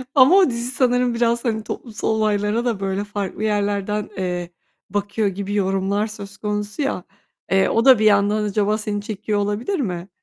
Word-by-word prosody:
Ama 270 +7 +7
o 380 -7 +6
dizi 235 +1 -3
sanırım 250 -1 +2
biraz, 235 +1 +1
hani, 220 -2 -1
toplumsal 225 -1 -5
olaylara 215 +1 +1
da 225 -5 0
böyle 195 +1 -2
farklı 205 0 -4
yerlerden, 205 0 -1
eee, 180 -2 -3 0.4
bakıyor 205 +1 -1
gibi 200 +1 -4
yorumlar 195 +1 0
söz 205 -2 -9
konusu 210 +4 -3
ya, 270 -10 -1 0.5
eee, 190 0 +4
o 230 +2 +1
da 260 -5 +8
bir 215 - +2
yandan 205 +1 +3
acaba 210 +1 +1
seni 210 -1 -3
çekiyor 210 -1 -2
olabilir 210 - -1
mi? 180 -6 -3
210 Hz, 170 wpm, -21 LUFS, 200-230 Hz, 0.5 s, da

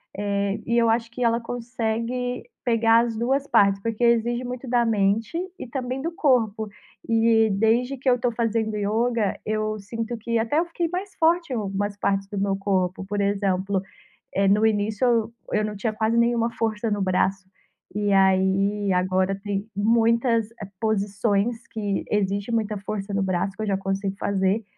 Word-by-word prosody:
Eh, 200 0 -1
e 235 +1 +1
eu 230 -1 +4
acho 230 0 +1
que 245 +2 -4
ela 230 0 +3
consegue 240 +1 -3 0.2
pegar 230 -2 +4
as 230 -1 -4
duas 270 +5 0
partes. 200 -4 +4
Porque 230 +2 -2
exige 235 +1 +2
muito 250 +1 -6
da 240 -1 +2
mente 215 +5 +1 0.2
e - - -7
também 255 +1 -3
do 330 +4 -2
corpo. 225 -9 +1 0.4
E 225 -1 +4
desde 230 +6 +1
que 265 - -8
eu 250 -1 +3
tô 245 0 +1
fazendo 225 -1 -1
yoga, 220 +1 0
eu 215 0 -1
sinto 230 +3 -4
que 230 +1 -1
até 230 +7 +1
eu 340 - +1
fiquei 340 0 -2
mais 375 +3 -5
forte 335 -1 +2
em - - -1
algumas 205 -1 -2
partes 195 -1 0
do 205 0 -6
meu 195 0 +1
corpo. 190 -2 -1
Por 205 +1 -2
exemplo, 195 -1 0 0.5
eh, 195 0 +3
no 210 +3 +4
início 215 +2 +1
eu 230 -1 +1 0.3
eu - - 0
não 210 0 -4
tinha 215 +2 -2
quase 220 +2 0
nenhuma 235 0 +2
força 225 0 -2
no 205 -1 0
braço. 190 0 0 0.5
E 205 -1 +1
aí, 195 +1 +3
agora 185 +1 +1
tem 205 0 -3
muitas, 230 +1 +2
eh, 205 - -5
posições 210 +2 0
que 205 -3 -2
exige 200 +1 0
muita 220 -2 0
força 200 0 -5
no 195 - +1
braço 190 +1 -1
que 220 - -3
eu - - -3
já 195 -1 +1
consigo 195 0 -2
fazer. 200 +2 0
220 Hz, 175 wpm, -24 LUFS, 200-235 Hz, 0.5 s, eu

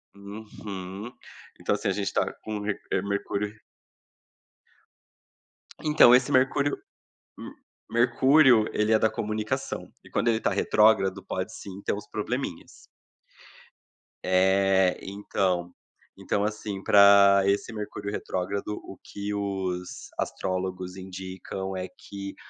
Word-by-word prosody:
Uhum. 100 0 -8 0.5
Então, - - 0
assim, - - -3
a - - +2
gente - - -2
está - - 0
com 105 -1 -4
eh, 100 -2 -2
Mercúrio 100 +1 -3 2.2
Então, 150 -5 +6
esse 125 0 +4
Mercúrio 140 +2 +2 0.6
M - - -8 0.4
Mercúrio, 130 0 +5
ele 105 +1 +1
é 110 - +6
da 110 - +3
comunicação, 110 0 -3
e - - -16
quando 120 - -1
ele 110 -1 +2
tá - - +1
retrógrado, 105 -3 +3
pode, 95 +4 -4
sim, 95 -1 -9
ter - - 0
uns 105 +1 -7
probleminhas. 110 -4 -4 1.5
É, 95 0 +3
então. 95 -3 -2 0.4
Então, 100 - -1
assim, 105 -2 -4
pra 100 -1 +7
esse 100 +3 0
Mercúrio 105 -1 -5
retrógrado, 100 +2 -3
o 95 - -10
que 100 0 -5
os 95 -3 -4
astrólogos 95 -1 -3
indicam 95 0 -6
é 95 0 -4
que 100 +1 -9
100 Hz, 115 wpm, -26 LUFS, 95-110 Hz, 2.2 s, pra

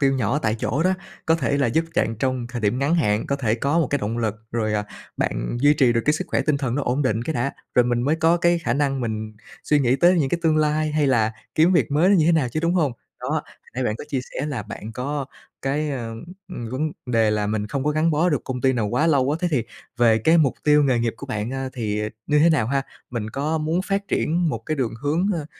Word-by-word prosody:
tiêu 135 -1 +3
nhỏ 135 +2 0
tại 110 -6 0
chỗ 140 +6 0
đó, 185 +2 +3 0.3
có 165 - +4
thể 140 -3 0
là 140 - +2
giúp 160 +8 +1
chạn 115 - +1
trong 130 -2 -1
thời 120 -1 -5
điểm 105 +4 +1
ngắn 140 +4 +1
hạn, 105 -11 +1
có 140 - 0
thể 115 -5 0
có 140 +7 0
một 160 - +2
cái 145 - 0
động 110 +2 -3
lực, 110 -3 0 0.2
rồi, 110 -2 0
à, 105 0 0 0.3
bạn - - -2
duy 145 +1 +5
trì 125 -4 +4
được 115 - +1
cái 150 - +3
sức 155 - -3
khỏe - - +2
tinh 150 -2 +1
thần 130 -4 -2
nó 145 - -1
ổn 130 +3 0
định 115 -4 0
cái 160 +4 -3
đã, 130 +4 -1 0.2
rồi 125 - +5
mình 120 -1 0
mới 150 +5 +1
có 165 +2 +3
cái 175 0 +2
khả 145 -8 -1
năng 140 -2 0
mình 110 -2 -3 0.3
suy 150 - +3
nghĩ 125 0 +2
tới 175 +6 +5
những 135 -3 +1
cái 175 - 0
tương 160 -1 +3
lai 155 0 +1
hay 150 -2 +2
là 115 -4 +2 0.2
kiếm 165 +4 +4
việc 145 -10 +2
mới 155 +6 +3
nó 200 - +5
như 160 - +3
thế 170 - +5
nào 150 -7 +2
chứ, 155 +6 -3
đúng 170 +2 +1
hông? 150 -8 +2 0.3
Đó, 125 - -4
hồi 155 -1 0 0.3
nãy 130 0 -1
bạn 105 - -1
có - - -7
chia 135 -3 -1
sẻ 140 - -2
là 135 -8 -3
bạn 110 +1 -8
có 140 +4 -3 0.4
cái, 145 +3 -1
ờ, 115 -5 -4 0.3
ừm, 120 -10 -6
vấn 150 +4 -2
đề 115 -3 +2
là 105 -1 0
mình 105 0 -1
không 135 +4 -3
có 150 - +2
gắn 155 +2 +2
bó 160 +4 +2
được 145 -6 -1
công 125 -1 -4
ty 130 0 +3
nào 115 -4 0
quá 125 +9 +1
lâu 140 -3 +3
á, 150 - +1
thế 180 - +1
thì 130 -7 +1 0.3
về 115 -2 +4
cái 160 +9 +4
mục 140 -5 +3
tiêu 150 -1 +5
nghề 130 -3 +2
nghiệp 115 -1 -1
của 140 - -9
bạn, 105 -3 -3
a, 135 0 -3
thì 105 -3 -2 0.2
như 150 - +3
thế 165 +3 +5
nào 145 -9 +2
ha? 135 +2 0 0.3
Mình 110 -3 -4
có 150 +5 -1
muốn 160 +4 0
phát 200 0 -2
triển 170 +1 +1
một - - -2
cái 155 - -1
đường 125 -5 -1
hướng, 155 +6 +1
ơ, 160 -5 -3
140 Hz, 280 wpm, -23 LUFS, 120-155 Hz, 0.4 s, duy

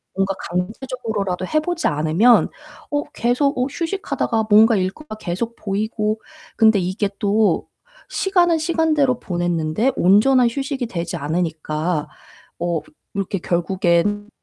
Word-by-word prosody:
뭔가 195 0 +1 0.2
강제적으로라도 205 -1 -3
해 310 - +2
보지 340 +2 -1
않으면 160 +11 +4 0.4
어 290 0 0
계속 275 +1 +1
어 250 - +2
휴식하다가 285 - -2
뭔가 220 +2 +6
일과가 205 +7 -3
계속 215 +4 -4
보이고 215 +1 -2 0.4
근데 220 -2 +5
이게 190 +3 -1
또 210 +1 +2 0.4
시간은 355 -4 +2
시간대로 310 -6 +1
보냈는데 175 +5 0
온전한 235 +7 +4
휴식이 270 -1 -3
되지 175 -3 -4
않으니까 155 0 -2 0.5
어 170 -2 -1 0.3
이렇게 195 0 -2
결국엔 180 +4 0
210 Hz, 285 characters per minute, -21 LUFS, 180-255 Hz, 0.5 s, 뭔가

